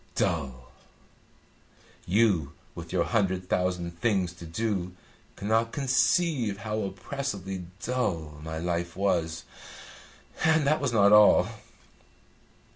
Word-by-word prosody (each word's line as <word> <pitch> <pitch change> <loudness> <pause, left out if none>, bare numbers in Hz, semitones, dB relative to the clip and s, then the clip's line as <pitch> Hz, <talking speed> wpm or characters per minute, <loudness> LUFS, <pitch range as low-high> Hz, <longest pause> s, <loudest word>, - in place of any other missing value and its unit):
Dull! 65 -7 -2 1.4
You, 90 -7 +2 0.2
with - - -9
your - - +2
hundred 95 -2 0
thousand 90 -2 -1
things 95 -7 +1
to 85 -1 -11
do, 95 0 -2 0.4
cannot 110 +3 0
conceive 135 - +1
how 105 +2 -3
oppressively 95 -2 -5 0.2
dull 85 -12 -2
my 80 +1 -5
life 85 +1 -3
was. 85 -4 0 1.0
And 160 -2 +3
that 150 +1 +2
was 140 -4 0
not 100 -3 +5
all!" 105 0 +7
95 Hz, 105 wpm, -27 LUFS, 85-115 Hz, 1.4 s, all